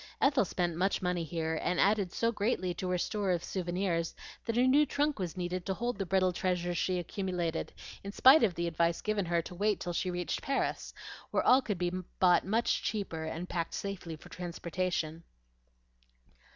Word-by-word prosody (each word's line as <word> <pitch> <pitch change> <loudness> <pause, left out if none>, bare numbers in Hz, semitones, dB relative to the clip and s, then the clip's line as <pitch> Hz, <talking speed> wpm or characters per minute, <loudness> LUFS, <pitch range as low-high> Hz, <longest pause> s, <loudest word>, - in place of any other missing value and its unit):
Ethel 275 -5 +4
spent 175 -2 -1
much 190 +3 0
money 180 -1 0
here, 160 0 -2
and 180 -1 0
added 200 -3 +3
so 230 +5 +1
greatly 205 -4 0
to 180 +2 -4
her 180 - +1
store 200 +2 -1
of 175 -2 +1
souvenirs 175 -2 -1 0.3
that 230 0 -1
a 250 - +5
new 275 +4 +6
trunk 290 -1 0
was 180 -1 -3
needed 180 0 -2
to 190 - 0
hold 240 +1 -2
the 195 - -2
brittle 185 0 +2
treasures 175 -1 -1
she 180 +2 0
accumulated 175 -2 -2 0.3
in 200 - -5
spite 265 +8 +7
of 195 -6 +2
the 170 - -1
advice 170 0 +1
given 215 -3 0
her 170 0 +1
to - - -9
wait 205 +3 +1
till 175 - -3
she 185 - -1
reached 175 -1 -2
Paris, 275 0 -1 0.4
where - - +1
all 255 +2 +7
could 205 -7 -2
be 175 0 0 0.3
bought 180 -1 +5
much 225 +5 +1
cheaper 180 -7 -3
and 165 +3 -4
packed 170 -2 -3
safely 190 -5 -5
for 155 - -14
transportation. 175 -2 -3
180 Hz, 190 wpm, -31 LUFS, 175-205 Hz, 0.4 s, spite